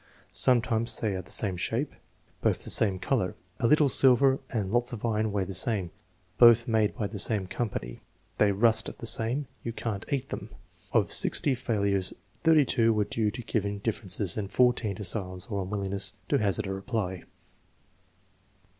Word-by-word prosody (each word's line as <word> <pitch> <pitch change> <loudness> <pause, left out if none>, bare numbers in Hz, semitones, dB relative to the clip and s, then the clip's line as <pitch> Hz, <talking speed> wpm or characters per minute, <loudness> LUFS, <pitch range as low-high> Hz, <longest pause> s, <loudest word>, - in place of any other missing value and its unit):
"Sometimes 115 -2 +1
they 105 -3 -2
are 95 - -4
the - - -18
same 100 -4 +3
shape." - - -3 0.5
"Both - - 0
the - - 0
same 100 -4 +6
color." 95 -3 -2 0.2
"A 115 - +1
little 150 +2 +4
silver 135 0 +4
and 105 -6 -3
lots 120 +1 0
of 115 -1 -6
iron 110 -1 -1
weigh 100 -1 -1
the 95 - -7
same." 95 -1 +1 0.5
"Both 120 -1 +6
made 110 -2 0
by 110 - -3
the 100 0 -6
same 105 -1 +3
company." 90 - -5 0.4
"They 105 -1 +4
rust 110 +2 +2
the - - -8
same." 120 +5 +3 0.2
"You 115 - -5
can't 110 -4 -5
eat 135 -1 -2
them" 100 - -7
(!) 90 0 -34
* - - -29
Of - - +1
60 140 - +3
failures, 100 -6 -1 0.3
32 140 -8 +3
were 105 -1 +1
due 105 +1 -1
to 120 - -8
giving 105 -2 -2
differences 100 -3 -2
and 100 -2 -4
14 120 -3 +1
to 105 - -7
silence 95 -1 -1
or 100 -4 -4
unwillingness 95 0 -3 0.2
to 140 - +2
hazard 105 0 0
a 95 - -4
reply. 95 -3 -4
110 Hz, 175 wpm, -27 LUFS, 100-120 Hz, 0.5 s, same